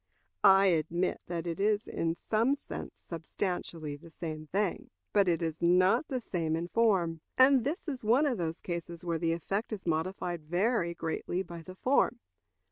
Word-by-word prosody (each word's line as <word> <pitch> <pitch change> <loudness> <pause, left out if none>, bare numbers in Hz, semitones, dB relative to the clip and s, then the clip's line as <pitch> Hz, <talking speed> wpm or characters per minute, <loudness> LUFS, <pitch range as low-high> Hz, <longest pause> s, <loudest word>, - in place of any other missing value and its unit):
I 195 0 +7
admit 170 0 +1
that 170 -1 -3
it 170 +1 -3
is 210 +1 +1
in 165 0 -1
some 225 +9 +1
sense 285 - -8
substantially 165 -2 -4
the 155 +3 -14
same 155 -2 -6
thing, 195 +2 -1 0.2
but 200 -2 +4
it 170 -1 +2
is 160 -1 -3
not 185 - +4
the 260 -3 -2
same 165 -8 -1
in 170 +2 -3
form. 185 -8 +2 0.2
And 260 -1 +6
this 315 - -3
is 270 -6 -4
one 245 +8 +4
of 255 -8 0
those 165 -1 -3
cases 170 -1 -5
where 165 -1 -1
the 165 0 +1
effect 195 +7 -2
is 210 -3 -5
modified 175 +1 -1
very 175 +2 +1
greatly 170 +3 -2
by 170 -2 -9
the 185 +3 -10
form. 260 +8 +2
175 Hz, 175 wpm, -31 LUFS, 165-210 Hz, 0.2 s, I